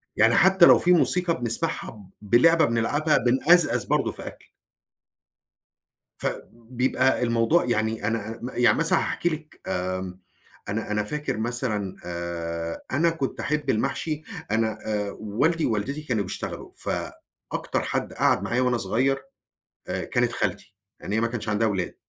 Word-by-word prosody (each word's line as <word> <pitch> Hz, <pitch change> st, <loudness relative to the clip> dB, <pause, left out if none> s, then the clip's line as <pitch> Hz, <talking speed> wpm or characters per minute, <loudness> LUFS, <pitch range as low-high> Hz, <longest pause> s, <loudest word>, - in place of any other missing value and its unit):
يعني 110 Hz, +2 st, +4 dB
حتى 190 Hz, -1 st, +6 dB
لو -, -, +7 dB
في 180 Hz, -, +3 dB
موسيقى 175 Hz, -2 st, +2 dB
بنسمَعها، 115 Hz, -3 st, -3 dB, 0.2 s
ب 105 Hz, +2 st, 0 dB
لعبة 165 Hz, +5 st, +6 dB
بنلعبها، 145 Hz, +6 st, +1 dB
بنأزأز 130 Hz, -, +3 dB
برضه -, -, +1 dB
في -, -, -8 dB
أكْل. -, -, -11 dB, 1.7 s
ف -, -, -2 dB, 0.2 s
بيبقى 125 Hz, +2 st, 0 dB
الموضوع 115 Hz, +8 st, +2 dB
يعني 110 Hz, -2 st, 0 dB
أنا 115 Hz, 0 st, -3 dB
م 125 Hz, -, -4 dB
يعني 120 Hz, 0 st, +4 dB
مثلًا 165 Hz, +1 st, +3 dB
هاحكي 175 Hz, -, -1 dB
لِك 155 Hz, -1 st, -7 dB
آمم، 95 Hz, 0 st, -3 dB, 0.5 s
أنا 105 Hz, +1 st, -3 dB
أنا 105 Hz, 0 st, +1 dB
فاكر 150 Hz, +3 st, -3 dB
مثلًا 110 Hz, -4 st, -2 dB
آآ 85 Hz, -1 st, -4 dB
أنا 160 Hz, +6 st, +3 dB
كنت 160 Hz, -5 st, -3 dB
أحب 150 Hz, 0 st, -2 dB
المحشي، 150 Hz, +6 st, -1 dB, 0.3 s
أنا 110 Hz, 0 st, 0 dB
آآ 105 Hz, -2 st, -2 dB
والدي 145 Hz, +11 st, 0 dB
ووالدتي 125 Hz, +7 st, -2 dB
كانوا 120 Hz, -9 st, -1 dB
بيشتغلوا، 90 Hz, -, -6 dB
فأكتر -, -, -4 dB
حد -, -, -2 dB
قعَد -, -, +2 dB
معايا 125 Hz, +1 st, 0 dB
وأنا 125 Hz, -1 st, +2 dB
صغير 135 Hz, +4 st, +1 dB, 0.7 s
آآ -, -, -2 dB
كانت 120 Hz, -2 st, +1 dB
خالتي 100 Hz, 0 st, -3 dB, 0.3 s
لأن -, -, -6 dB
هي 110 Hz, -, +2 dB
ما 115 Hz, -, +2 dB
كانش 115 Hz, -2 st, -5 dB
عندها 110 Hz, +2 st, +2 dB
ولاد. 95 Hz, -4 st, -2 dB
115 Hz, 145 wpm, -25 LUFS, 105-145 Hz, 1.7 s, لو